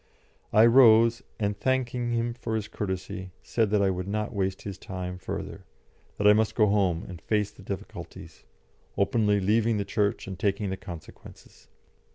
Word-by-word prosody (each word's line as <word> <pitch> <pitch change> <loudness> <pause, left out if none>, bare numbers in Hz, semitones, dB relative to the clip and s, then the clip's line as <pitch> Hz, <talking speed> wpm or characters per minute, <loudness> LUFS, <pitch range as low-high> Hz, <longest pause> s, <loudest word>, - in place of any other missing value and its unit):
I 110 +2 +6
rose, 115 -1 +6 0.2
and, 100 -1 0
thanking 125 -2 0
him 115 0 0
for 115 -2 -4
his 110 -2 -2
courtesy, 95 -1 -5
said 115 -3 0
that 105 -1 +2
I 95 - +3
would 90 0 -4
not 105 +1 -2
waste 95 -2 -2
his 100 -2 -7
time 90 -1 -6
further, 95 - -6 0.5
that 105 - -2
I 105 - +9
must 110 0 +1
go 110 - +4
home 95 -5 +1
and 90 -4 -9
face 105 +1 0
the - - -16
difficulties, - - -8 0.5
openly 105 0 +2
leaving 110 +3 +2
the 100 - -2
Church 100 0 0
and 95 -2 -7
taking 100 -1 0
the - - -1
consequences. 85 -5 -12
105 Hz, 170 wpm, -27 LUFS, 95-110 Hz, 0.5 s, I